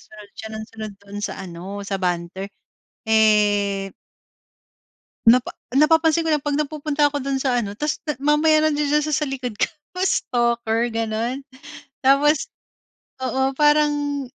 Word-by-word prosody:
sunod 210 -1 -15
siya 220 - -7
ng 220 0 -5
sunod 215 -2 -7
do'n 200 0 -9
sa - - -3
ano 190 +2 -7
sa 195 -1 -2
banter, 180 +2 -2 0.6
eh 205 -3 +3 1.4
napa 240 +2 +5 0.2
napapansin 320 +3 +3
ko - - +1
lang 295 - -1
'pag 290 -1 -1
nagpupunta 300 0 0
ako 290 -1 -2
do'n 275 0 -1
sa 250 -3 +1
ano, 205 0 -6
'tas 300 0 -2
na 300 -4 -4
mamaya 300 +2 +3
nandidiyan 295 0 +1
siya 305 - 0
sa 300 +2 0
likod 255 -4 -4
ko, - - +1 0.3
stalker 235 -7 +1
gano'n. 230 +4 -3 0.6
Tapos 280 +3 +3 0.7
oo 265 +1 0
parang, 295 -2 +2
255 Hz, 140 wpm, -22 LUFS, 215-295 Hz, 1.4 s, napa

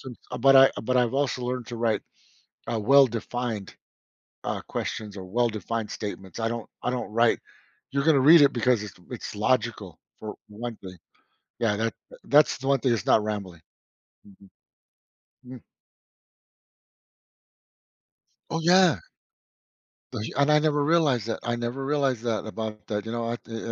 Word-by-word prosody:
some 125 -3 -9 0.2
but 135 +1 +6
I 135 0 +8
but 130 +3 0
I've 120 -1 +2
also 135 -3 0
learned 125 -1 -3
to 120 - -6
write, 115 -2 0 0.7
uh, 115 - -1
well-defined, 120 -3 +1 0.7
uh, - - -3
questions 105 -2 -5
or 95 - -7
well-defined 115 +1 -2
statements. 100 -1 -6
I 115 - 0
don't 115 -1 -5
I 125 - 0
don't 125 -4 -4
write 115 0 +3 0.5
you're 140 0 0
gonna 155 -4 +4
read 155 +3 +8
it 140 - +5
because 120 -2 +1
it's 105 -3 -8 0.2
it's - - -7
logical - - -1 0.2
for 110 -1 -7
one 115 +2 -6
thing. 90 -2 -11 0.6
Yeah, 110 -3 +1
that 110 +1 -1 0.3
that's 150 +1 +4
the 135 - -6
one 140 - +3
thing 125 0 +1
that's 110 -6 -2
not 110 - +4
rambling. 100 -6 -5 0.7
Mhm. 100 -1 -18 1.0
Mm. 125 -1 -10 2.9
Oh 165 - -1
yeah. 175 -1 +5 1.1
But 105 - -4 0.2
and 140 +1 +3
I 150 - +6
never 150 -1 +1
realized 145 -8 +2
that. 115 - -3
I 120 - -1
never 120 +3 -4
realized 135 -4 0
that 115 -3 -2
about 110 -1 -6
that, 105 -1 -3
you 110 - -5
know, 115 -1 -2
I 120 - -2
th 115 -1 -8
120 Hz, 155 wpm, -26 LUFS, 110-135 Hz, 2.9 s, I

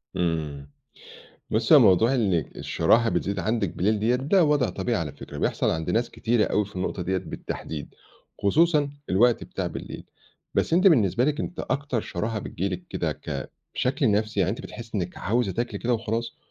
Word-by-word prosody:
إمم. 75 -5 -2 0.8
بُصّي، - - +4
هو - - +10
موضوع 115 +8 +5
إنِّك 95 - 0
الشراهة 115 +8 +2
بتزيد 100 -2 -1
عندِك 105 +1 -1
بالليل 105 +4 +2
ديّة، 115 +4 +2
ده 150 +8 +3
وضع 145 -3 +2
طبيعي 120 -3 -1
على 75 -4 -4
فكرة 70 - -9
بيحصل - - +1
عند 80 0 -2
ناس 115 +1 +1
كتيرة 115 -1 +1
أوي 105 - +1
في 100 -1 -13
النقطة 90 0 -2
دِيّة 95 +2 0
بالتحديد، 75 -4 -6 0.5
خصوصًا 150 - +3 0.2
الوقت 115 +5 +3
بتاع - - -4
بالليل. - - -7 0.5
بس - - +1
أنتِ 180 +4 +4
بالنسبة 120 - +4
لِك 150 0 0
أنتِ 175 - -4
أكتر 140 -4 -1
شراهة 110 +4 -3
بتيجي 95 -1 -3
لِك 90 -1 -5
كده - - -1
ك 70 -4 -6 0.2
بشكل 130 -2 +1
نَفْسي، 105 0 0
يعني 90 0 +2
أنتِ 110 - -4
بتحسّي 115 -1 -9
إنِّك 90 0 -4
عاوزة 110 -1 0
تاكلي 120 +5 -3
كده 120 +1 0
وخلاص، 115 +1 -3
110 Hz, 180 wpm, -25 LUFS, 90-125 Hz, 0.8 s, هو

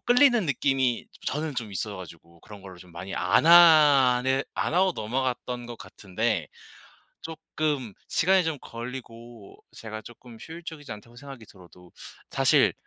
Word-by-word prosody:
끌리는 245 -5 +4
느낌이 135 -3 0 0.2
저는 150 +1 -3
좀 115 -4 -4
있어 100 +2 -4
가지고 85 -2 -13
그런 100 +1 -13
거를 95 -2 -11
좀 90 0 -16
많이 95 +3 -7
안 90 - +2
하는 140 -6 +6
안 - - -2
하고 185 +1 +3
넘어갔던 125 +1 -3
거 120 - -7
같은데 100 -4 -3 0.8
쪼끔 155 -6 -4
시간이 190 +2 +2
좀 160 -2 -2
걸리고 115 -2 -10 0.2
제가 110 -1 -8
쪼끔 120 +1 -14
효율적이지 160 -3 -10
않다고 115 +3 -15
생각이 135 -4 -11
들어도 90 -2 -18 0.4
사실 - - +3
125 Hz, 300 characters per minute, -26 LUFS, 105-150 Hz, 0.8 s, 하는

